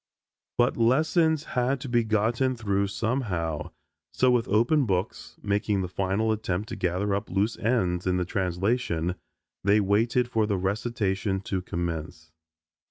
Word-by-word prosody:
But 120 +1 +2
lessons 155 +6 +3
had 125 +1 0
to 135 - -5
be 120 -1 +2
gotten 115 +4 +1
through 100 -3 0
somehow 100 - -2 0.4
so 125 +11 +3
with 120 -2 +2
open 120 +7 +3
books, 95 +1 -3
making 100 -1 0
the 90 - -2
final 95 +4 0
attempt 105 -1 -2
to - - -4
gather 95 +3 -1
up 100 +2 -2
loose 100 +4 0
ends 95 -7 0
in 90 0 +2
the 90 - 0
translation, 90 -1 -1 0.5
they 100 +2 +4
waited 115 +5 +2
for 110 -3 +1
the 100 -2 0
recitation 100 0 -1
to 95 -1 -3
commence. 80 -3 -5
105 Hz, 145 wpm, -26 LUFS, 95-120 Hz, 0.5 s, they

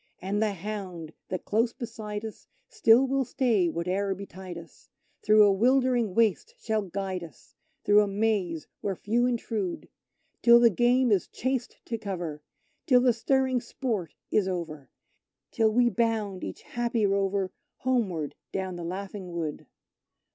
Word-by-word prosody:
And 200 +3 -2
the 215 -2 +1
hound 185 -4 -6 0.2
that 185 -1 -4
close 230 +2 +1
beside 220 -3 -6
us 220 - -9 0.2
still 270 - +5
will 270 0 +1
stay 230 -7 +1
whate'er 185 +4 -1
betide 185 -2 -8
us 170 -1 -14 0.3
Through 215 0 +6
a 205 - +6
'wildering 245 -1 +2
waste 230 - +1
shall 220 - -1
guide 190 -1 -4
us 160 -8 -14 0.3
through 205 0 +6
a 205 - +1
maze 195 -6 0
where 195 -2 -2
few 235 +6 +1
intrude, 220 -6 -3 0.5
Till 235 0 +8
the 235 -1 +6
game 245 +4 +3
is 195 -3 +2
chased 260 -1 -3
to 230 -1 -4
cover, 175 -8 -5 0.5
till 250 -3 +6
the 250 -1 +4
stirring 260 +1 +1
sport 225 - -4 0.2
is 205 -3 +2
over, 165 -6 -5 0.6
Till 225 -2 +3
we 240 +3 +3
bound, 225 -5 0
each - - -6
happy 235 -2 -1
rover, 195 -1 0 0.2
homeward 200 - -1 0.2
down 190 -2 -3
the 175 - -6
laughing 190 +1 -6
wood. 160 -3 -4
210 Hz, 145 wpm, -27 LUFS, 185-235 Hz, 0.6 s, Till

